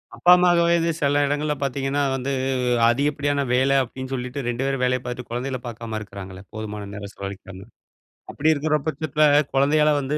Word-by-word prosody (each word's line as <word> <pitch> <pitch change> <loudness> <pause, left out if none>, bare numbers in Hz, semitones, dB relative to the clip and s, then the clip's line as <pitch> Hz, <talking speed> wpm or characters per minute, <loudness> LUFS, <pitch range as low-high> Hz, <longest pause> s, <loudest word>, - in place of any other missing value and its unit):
அப்பா 175 - +4
அம்மாக்கு 175 -1 +4
வயது 170 0 +2
சில 145 0 +2
இடங்கள்ல 145 +1 0
பார்த்தீங்கன்னா 135 +1 -1
வந்து 135 +1 -2 0.6
அதிகப்படியான 140 +2 +1
வேல 135 +2 +3
அப்படின்னு 130 +2 -8
சொல்லிட்டு 125 +1 -4
2 120 +2 -1
பேரும் 135 -2 -1
வேலய 125 0 +2
பார்த்துட்டு 125 0 -6
குழந்தைகள 130 +2 -3
பார்க்காம 115 -1 -5
இருக்கிறாங்களே 100 -1 -9
போதுமான 105 -2 -6
நேரம் 100 0 -8
செலவழிக்காம. 100 -1 -8 0.7
அப்படி 155 +2 +2
இருக்கிற 150 +1 0
பட்சத்துல 155 0 +1 0.3
குழந்தையால 150 +2 +3
வந்து 140 +3 -2
135 Hz, 155 wpm, -23 LUFS, 120-145 Hz, 0.7 s, அப்பா